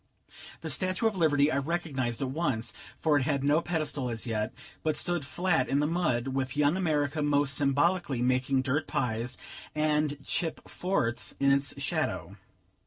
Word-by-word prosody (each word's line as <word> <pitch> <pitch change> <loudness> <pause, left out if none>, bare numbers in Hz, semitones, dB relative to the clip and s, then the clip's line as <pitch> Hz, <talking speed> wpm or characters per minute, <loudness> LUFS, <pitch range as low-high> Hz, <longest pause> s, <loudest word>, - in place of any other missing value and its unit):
The - - -4
statue 185 +3 0
of 220 -2 +2
Liberty 150 -4 +3
I 130 - +1
recognized 140 -6 -2
at 130 - -2
once, 135 -7 -1 0.3
for 150 -2 +3
it - - -1
had 140 0 0
no 145 +3 +3
pedestal 155 -7 -1
as 115 0 -4
yet, 110 -2 -1 0.3
but 155 -1 0
stood 175 -3 +1
flat 140 -2 0
in 140 - +2
the 150 - +2
mud, 150 -7 0
with 130 0 -2
Young 150 +2 +3
America 155 -4 0
most 145 -1 +2
symbolically 140 0 +2
making 130 +1 +2
dirt 140 +3 0
pies, 120 +1 -1 0.4
and 150 -1 +1
chip 165 -2 -2
forts, 150 -11 0
in 140 0 +4
its 140 0 +1
shadow. - - -2
145 Hz, 165 wpm, -29 LUFS, 130-160 Hz, 0.4 s, in